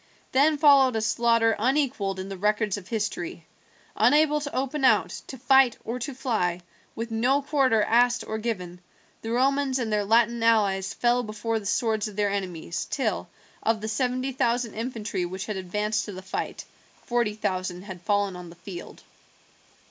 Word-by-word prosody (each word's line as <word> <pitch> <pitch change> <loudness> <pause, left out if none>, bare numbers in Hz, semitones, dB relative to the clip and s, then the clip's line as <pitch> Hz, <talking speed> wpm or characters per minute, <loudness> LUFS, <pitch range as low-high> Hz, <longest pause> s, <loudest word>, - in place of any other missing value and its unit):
Then 295 +3 +4
followed 280 -4 +6
a - - +1
slaughter 230 0 +2
unequalled 245 -6 0
in 190 - -5
the 195 - -6
records 210 +1 +1
of 195 -3 -9
history. 200 -7 -3 0.5
Unable 300 0 +4
to 285 -1 -5
open 270 +2 -2
out, 260 - +4 0.2
to 265 - -8
fight, 265 -1 +4
or 240 +2 -3
to 260 +2 -5
fly, 180 -9 -1 0.3
with 230 +1 -5
no 255 +6 +2
quarter 265 -7 +2
asked 240 +2 +3
or 220 0 -4
given, 180 -6 -4 0.4
the 225 - -5
Romans 270 +2 +1
and 230 -4 -2
their 210 -1 +2
Latin 230 +2 +3
allies 205 -4 +2
fell 245 0 +2
before 220 0 -3
the 200 - -7
swords 220 0 0
of 210 - -9
their 205 -1 +1
enemies, 180 -4 -4
till, 215 -9 -2 0.3
of 225 0 +1
the 215 - -5
seventy 255 +4 -1
thousand 240 -3 0
infantry 220 -5 -3
which 185 +2 -4
had 215 - -4
advanced 210 +3 -1
to 205 - -7
the 185 0 -8
fight, 190 - -4 0.4
forty 235 -4 0
thousand 185 -3 -3
had 190 -3 -9
fallen 205 0 0
on 180 -1 -9
the 170 - -13
field. 175 0 -10
225 Hz, 170 wpm, -26 LUFS, 200-250 Hz, 0.5 s, followed